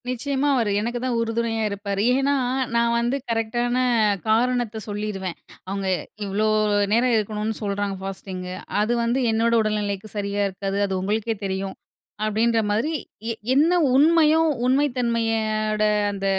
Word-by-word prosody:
நிச்சயமா 270 +3 -1
அவரு 230 -5 +1
எனக்குதான் 240 +2 -2
உறுதுணையா 225 -1 -1
இருப்பாரு. 200 0 -3
ஏன்னா, 275 +2 +2 0.4
நான் 235 0 +2
வந்து 240 +3 0
கரெக்ட்டான 240 +2 0 0.5
காரணத்த 230 0 +1
சொல்லிருவேன். 205 -3 -4 0.3
"அவுங்க 195 0 -2 0.4
இவ்ளோ 205 +2 0 0.5
நேரம் 240 +2 +3
இருக்கணுனனு 215 0 -2
சொல்றாங்க 200 -1 -2
ஃபாஸ்டிங்கு 185 -1 -6 0.3
அது 220 +3 +1
வந்து 235 +3 +1
என்னோட 230 +1 +2
உடல்நிலைக்கு 210 -1 -2
சரியா 200 0 -1
இருக்காது. 195 +1 -3
அது 195 - -3
உங்களுக்கே 220 +3 -1
தெரியும்" 190 0 -3 0.5
அப்பிடின்றமாரி, 220 +4 +1 0.4
எ - - -1 0.2
என்ன 305 +6 +4 0.2
உண்மையோ, 315 +2 +5 0.2
உண்மைத்தன்மையோட 225 -5 +1 0.3
அந்த 195 -1 -5
220 Hz, 115 wpm, -23 LUFS, 205-240 Hz, 0.5 s, உண்மையோ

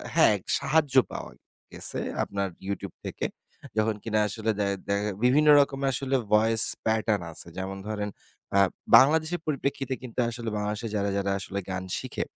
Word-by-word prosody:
হ্যাঁ, - - +6 0.2
সাহায্য 145 -3 +1 0.2
পাওয়া - - -6 0.4
গেছে - - -1 0.2
আপনার 100 -1 -2 0.2
YouTube 100 - -5
থেকে। - - -4 0.5
যখন 110 0 +2
কিনা 110 -1 0
আসলে 110 +2 -1
দ্যা 100 - +1 0.2
দ্যা 100 0 +1 0.3
বিভিন্ন 140 +5 +4
রকমের 135 -1 0
আসলে 135 +1 -1 0.2
voice 110 +1 +4 0.2
pattern 110 -2 +1
আছে। 80 - -4
যেমন 95 +1 -4
ধরেন 105 -1 -3 0.5
আ - - +6 0.4
বাংলাদেশের 155 +6 +3
পরিপ্রেক্ষিতে 140 -2 -2
কিন্তু 125 0 -6
আসলে 115 -1 -4
বাংলাদেশে 105 +2 -3
যারা, 100 -1 0
যারা 100 0 0
আসলে 95 +1 -4
গান 90 0 -3
শিখে, - - -4
110 Hz, 150 wpm, -27 LUFS, 100-135 Hz, 0.5 s, হ্যাঁ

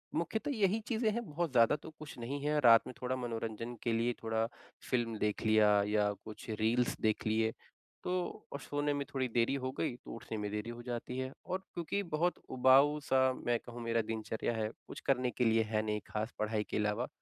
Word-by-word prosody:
मुख्यतः 220 - -1
यही 210 -2 +2
चीज़ें 225 -1 +1
हैं 235 +3 -2
बहुत 165 +1 -1
ज़्यादा 115 +2 +5
तो 150 - -9
कुछ 155 -3 -9
नहीं 130 +5 -3
है। 150 0 +2
रात 115 -3 +8
में - - -6
थोड़ा 130 +1 0
मनोरंजन 115 -1 -4
के 120 - +1
लिए 115 +2 +1
थोड़ा 110 0 +1 0.4
फ़िल्म 115 -3 0
देख 105 -1 0
लिया 110 -1 +6 0.2
या 105 -1 +2
कुछ 110 +1 -9
रील्स 120 +3 +2
देख 110 -1 +1
लिए 110 +1 +2 0.5
तो - - -2 0.4
और 140 - -3
सोने 145 +1 -1
में 140 0 -2
थोड़ी 130 -2 +1
देरी 120 +2 +3
हो 130 - -1
गई 120 - 0
तो 120 - -11
उठने 115 -1 -6
में 105 -1 -2
देरी 105 +2 -3
हो 120 0 -6
जाती 125 +1 -4
है 130 0 -2
और 185 - -2
क्योंकि 175 +4 -1
बहुत 175 +3 +2
उबाऊ-सा 130 0 +5
मैं 120 0 +3
कहूँ 120 0 -9
मेरा 115 0 +2
दिनचर्या 110 +1 -2
है 110 -1 -1 0.2
कुछ - - -7
करने 125 -2 +2
के 125 - 0
लिए 115 0 +4
है 110 -1 +2
नहीं 105 0 0
ख़ास 110 +3 -3
पढ़ाई 110 0 0
के - - -1
अलावा। 105 0 0
120 Hz, 205 wpm, -34 LUFS, 110-140 Hz, 0.5 s, रात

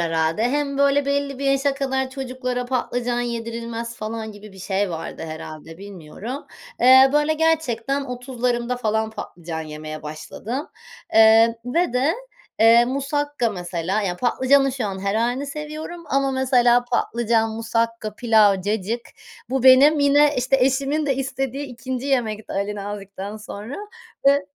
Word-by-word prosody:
herhâlde. 165 +3 0
Hem 280 +2 -1
böyle 280 0 +3
belli 280 -1 -1
bir 280 - -4
yaşa 275 0 +2
kadar 265 -1 -1
çocuklara 255 -2 -4
patlıcan 245 -1 -1
yedirilmez 235 0 -4
falan 220 0 -5
gibi 205 0 -13
bir 190 - -14
şey 190 +1 -1
vardı 165 -1 -6
herhâlde, 160 0 -9
bilmiyorum. 200 - -8 0.3
Eee, 260 +2 +7
böyle 295 +1 +3
gerçekten 280 -5 0
30'larımda 250 -1 -2
falan 220 -2 -1
patlıcan 170 -6 -7
yemeye 155 0 -7
başladım. 210 - -6 0.5
Eee, 225 +1 +6
ve 255 +4 0
de, 265 +6 +2 0.5
eee, 230 +1 +7
musakka 275 -1 -1
mesela, 180 +1 -2
ya, 180 -3 -2
patlıcanın 270 +4 +3
şu 255 -4 -3
an 195 -1 -4
her 200 0 0
hâlini 245 +5 0
seviyorum 305 +4 -7
ama 275 0 +1
mesela 250 -2 +3
patlıcan 235 -2 0
musakka, 230 -1 -2
pilav, 215 -4 +4
cacık, 215 +3 -1 0.5
bu 265 -1 0
benim 270 +4 +7
yine, 290 +1 +4
işte, 255 +2 +2
eşimin 275 +4 +1
de 275 - +2
istediği 270 +1 -3
2'nci 255 +1 -5
yemekti 225 -6 -1
Ali 200 +1 -2
Nazik'ten 200 0 -6
sonra 215 +4 -8 0.5
ve 280 +1 +4
240 Hz, 140 wpm, -22 LUFS, 215-275 Hz, 0.5 s, Eee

